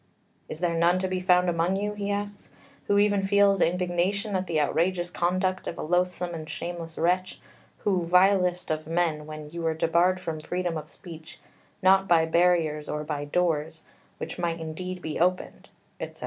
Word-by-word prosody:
"Is 155 - -7
there 175 -2 +1
none 170 +2 +3
to 185 0 -1
be 185 0 -2
found 180 0 +3
among 170 +2 +1
you," 205 +1 -2
he 205 -1 -4
asks, 205 0 -4 0.4
"who 200 - +3
even 205 -1 +3
feels 200 -1 +3
indignation 180 +4 0
at 185 0 -1
the 160 -2 0
outrageous 175 +4 0
conduct 185 +2 0
of - - -4
a - - -4
loathsome 180 +1 0
and 160 -1 -7
shameless 165 0 -6
wretch 180 +2 0 0.4
who, 190 -3 0
vilest 180 0 +3
of 155 0 -3
men, 160 -2 0
when 155 -1 -8
you 170 +1 -6
were 160 -1 0
debarred 170 +3 +2
from 165 -3 -4
freedom 175 +2 -3
of 155 -1 -6
speech, 160 0 -11 0.4
not 190 +1 +5
by 165 -3 +4
barriers 160 -3 +2
or 150 0 -3
by 150 -1 -4
doors, 160 -1 -1 0.3
which - - -6
might 170 -1 -1
indeed 180 +3 -6
be 155 - -4
opened," 180 +2 -1 0.3
etc. - - -7
175 Hz, 175 wpm, -26 LUFS, 160-185 Hz, 0.4 s, not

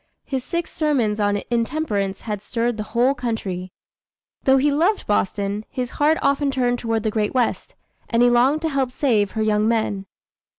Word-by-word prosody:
His 265 -2 -3
six 340 +3 -3
sermons 255 -9 +1
on 205 -1 +1
intemperance 230 -6 -1
had 210 -3 -4
stirred 235 +1 -1
the - - -2 0.2
whole 255 +3 +4
country. 205 -8 -4 0.7
Though 265 0 +5
he 285 +2 +3
loved 345 +9 +1
Boston, 205 0 -1
his 250 -1 -4
heart 310 +2 +4
often 280 +1 +2
turned 245 -2 0
toward 225 -2 -1
the 220 - 0
great 210 +2 -1
West, 245 -2 -1 0.3
and 235 0 +3
he 245 - +6
longed 265 +6 +3
to 320 - +1
help 270 -3 0
save 225 -7 +1
her 220 - 0
young 215 0 +2
men. 215 -4 0
235 Hz, 175 wpm, -22 LUFS, 210-275 Hz, 0.7 s, he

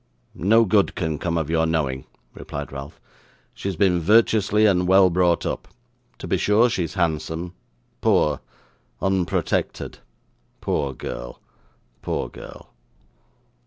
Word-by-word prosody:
'No 115 +6 +4
good 100 0 +2
can 80 -5 -2
come 85 -1 -1
of 80 -3 -1
your 80 0 +1
knowing,' 70 -5 -1 0.3
replied 70 0 -7
Ralph. 70 +2 -8 0.5
'She - - -6
has 95 - -3
been 90 0 +3
virtuously 105 +2 +3
and 90 -3 +3
well 95 0 +6
brought 85 -1 +2
up; - - -3 0.5
to - - -8
be - - +1
sure 110 +4 +3
she 90 - 0
is 80 - -9
handsome, 85 0 -2 0.5
poor, 75 - +2 0.6
unprotected! 95 -1 -1 0.6
Poor 70 -2 -1
girl, - - -7 0.6
poor - - -3
girl. - - -12
85 Hz, 125 wpm, -23 LUFS, 80-100 Hz, 0.6 s, well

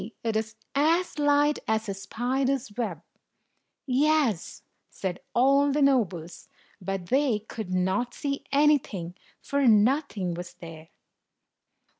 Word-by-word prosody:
It 225 -1 -1
is 220 +1 -2 0.2
as 320 +3 +1
light 290 0 +3
as 220 0 0
a 200 - -2
spider's 245 +4 -2
web." 200 -9 -3 0.8
"Yes," 275 - +1 0.3
said 185 -2 -4 0.2
all 275 +3 +4
the 290 +1 +2
nobles; 190 - 0 0.3
but 190 -1 -4
they 265 -3 +2
could 215 -2 -7
not 190 +7 0
see 280 -1 -3
anything, 275 - +2 0.3
for 280 -2 +1
nothing 215 - +2
was 175 +1 -7
there. 165 -2 -11
235 Hz, 115 wpm, -27 LUFS, 190-280 Hz, 0.8 s, all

